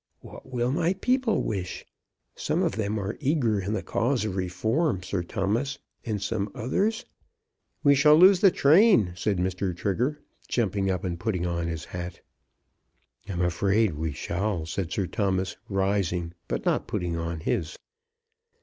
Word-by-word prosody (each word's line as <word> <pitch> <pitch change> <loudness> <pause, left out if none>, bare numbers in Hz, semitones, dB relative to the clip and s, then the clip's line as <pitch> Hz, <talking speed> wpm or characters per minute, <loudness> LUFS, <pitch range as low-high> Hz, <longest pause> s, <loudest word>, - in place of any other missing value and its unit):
What 130 - -12
will 125 0 0
my 170 +4 +1
people 250 +3 +1
wish? 95 -4 -4 0.5
Some - - 0
of - - +1
them 110 -1 -2
are 100 +2 -3
eager 130 -8 +1
in 100 +3 -2
the 95 -5 -2
cause 120 +4 0
of 100 -4 -3
reform, 95 - 0
Sir 95 0 -2
Thomas; 110 +10 -1 0.3
and 110 -3 -2
some 100 0 -2
others 200 - 0 0.4
" 445 - -51
"We 145 -2 +6
shall 150 +2 +6
lose 185 +3 +7
the 195 - +7
train," 155 - +5
said 95 +2 0
Mr. 90 0 -1
Trigger, 125 - -1 0.3
jumping 100 -4 0
up 90 -2 -1
and 85 -3 -3
putting 95 -4 -1
on 85 -1 -1
his 80 -1 -4
hat. 90 -1 -6 1.1
"I'm 90 -2 -2
afraid 95 +3 +2
we 80 +1 -3
shall," 85 +3 -2
said 85 +1 -3
Sir 95 - 0
Thomas 95 -2 -1
rising, 95 -4 0
but - - -3
not - - +1
putting 85 -1 -2
on 85 -1 -3
his. 85 -4 -2
100 Hz, 160 wpm, -26 LUFS, 90-130 Hz, 1.1 s, lose